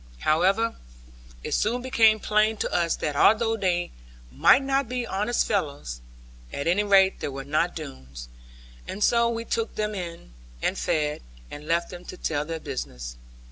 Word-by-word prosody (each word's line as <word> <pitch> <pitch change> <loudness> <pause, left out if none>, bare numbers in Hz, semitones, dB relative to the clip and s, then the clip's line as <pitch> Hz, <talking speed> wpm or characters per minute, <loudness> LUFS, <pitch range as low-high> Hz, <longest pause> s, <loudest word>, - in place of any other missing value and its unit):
However, 195 +9 +2 0.7
it - - -5
soon 240 +4 0
became 225 -4 +4
plain 215 +1 +2
to - - -2
us 170 -2 +1
that 150 -2 -3
although 225 +7 +4
they 180 -4 0 0.4
might 260 - +5
not 270 -2 0
be 250 -1 -2
honest 210 +4 0
fellows, 145 - -2 0.5
at 140 - -4
any 180 +5 +2
rate 195 -2 +4
they - - -3
were 135 -1 -6
not 155 +5 0
Doones; 65 - -9 0.6
and 205 - -3
so 235 -1 +4
we 230 0 -3
took 225 -1 -2
them 210 0 -1
in, 170 - -7 0.3
and - - 0
fed, 150 -1 -1 0.3
and 150 +1 -9
left 170 +1 0
them 180 -1 -9
to 185 - -9
tell 150 -4 -2
their 165 0 -4
business. 60 - -6
185 Hz, 165 wpm, -25 LUFS, 150-220 Hz, 0.7 s, might